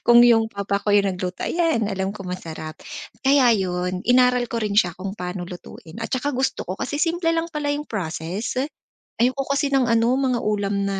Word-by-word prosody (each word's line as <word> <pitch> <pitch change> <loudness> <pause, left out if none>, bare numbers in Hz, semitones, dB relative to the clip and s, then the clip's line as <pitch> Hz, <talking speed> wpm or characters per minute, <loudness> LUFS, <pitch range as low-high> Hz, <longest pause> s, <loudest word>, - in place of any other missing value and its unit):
Kung 240 0 +7
yung 225 -2 +5
papa 200 -1 -2
ko - - -5
yung 205 -1 +5
nagluto, 180 0 -4
ayan, 330 -10 +1
alam 195 -2 -2
ko 195 -1 -7
masarap. 160 -3 -6 0.5
Kaya 265 -3 +5
yun, 180 -2 -1
inaral 250 -1 +4
ko 230 -1 -2
rin 210 - -1
siya 180 -4 +2
kung 190 +1 -5
paano 180 -2 -5
lutuin 175 +1 -10
at 225 - -3
saka 275 +3 -1
gusto 260 +1 -1
ko - - -4
kasi 290 - -2
simple 335 +2 0
lang 330 0 -2
pala 295 -1 -2
yung 290 +1 -1
process. 185 - -4 0.6
Ayoko 260 +3 +1
kasi 280 0 0
ng 265 -3 +3
ano 230 0 +3
mga 255 -3 +1
ulam 205 -1 0
na 195 -1 -1
220 Hz, 195 wpm, -23 LUFS, 190-260 Hz, 0.6 s, Kung